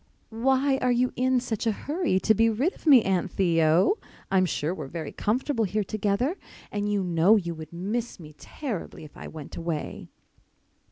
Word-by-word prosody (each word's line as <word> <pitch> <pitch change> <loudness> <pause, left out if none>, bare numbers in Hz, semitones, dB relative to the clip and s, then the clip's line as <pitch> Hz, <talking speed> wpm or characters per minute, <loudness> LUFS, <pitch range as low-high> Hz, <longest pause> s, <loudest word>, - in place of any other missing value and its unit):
"Why 265 +3 +2
are 255 - +2
you 245 +1 +1
in 255 0 +2
such 235 -2 -3
a - - +4
hurry 295 - -1
to 220 - +4
be 225 +2 +3
rid 260 - 0
of - - -14
me, 265 -6 +8
Aunt 190 -2 0
Theo? 170 - +3 0.3
I'm 185 -1 +3
sure 160 0 -1
we're 185 - -6
very 160 +1 -6
comfortable 235 +2 0
here 210 +2 -1
together 215 - -1 0.3
and 205 0 -1
you 200 -2 +1
know 175 +4 +4
you 175 -5 -1
would 160 -1 -9
miss 210 +8 -3
me 155 -2 -11
terribly 225 - -6
if 150 - -13
I - - -8
went 155 -3 -9
away." 165 -2 -4
205 Hz, 180 wpm, -26 LUFS, 170-250 Hz, 0.3 s, me